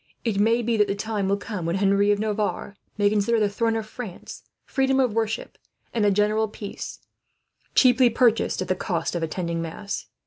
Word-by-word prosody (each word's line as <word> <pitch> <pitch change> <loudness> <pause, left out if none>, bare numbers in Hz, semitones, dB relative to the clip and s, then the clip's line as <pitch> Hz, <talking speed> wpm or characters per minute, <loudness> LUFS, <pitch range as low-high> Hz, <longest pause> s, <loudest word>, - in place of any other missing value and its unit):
It 215 -4 0
may 230 +3 +3
be 230 0 +1
that 210 -1 +4
the 200 - -1
time 205 -2 -2
will 200 - +2
come 205 -3 -5
when 170 - 0
Henry 200 +1 +3
of 205 - +4
Navarre 210 -1 -2 0.2
may 205 -1 +3
consider 215 +2 +2
the 210 - +3
throne 225 +3 0
of 220 -1 -2
France, 215 -4 -8 0.2
freedom 270 -1 +1
of 250 -5 +2
worship, 225 0 -2 0.3
and 225 - +1
a - - +6
general 210 +2 +2
peace, 205 -1 -8 0.7
cheaply 255 -1 +6
purchased 230 -4 +2
at - - -9
the 185 - +2
cost 175 -2 -2
of 170 - -2
attending 165 +1 -2
mass. 200 +5 -5
210 Hz, 195 wpm, -24 LUFS, 200-225 Hz, 0.7 s, a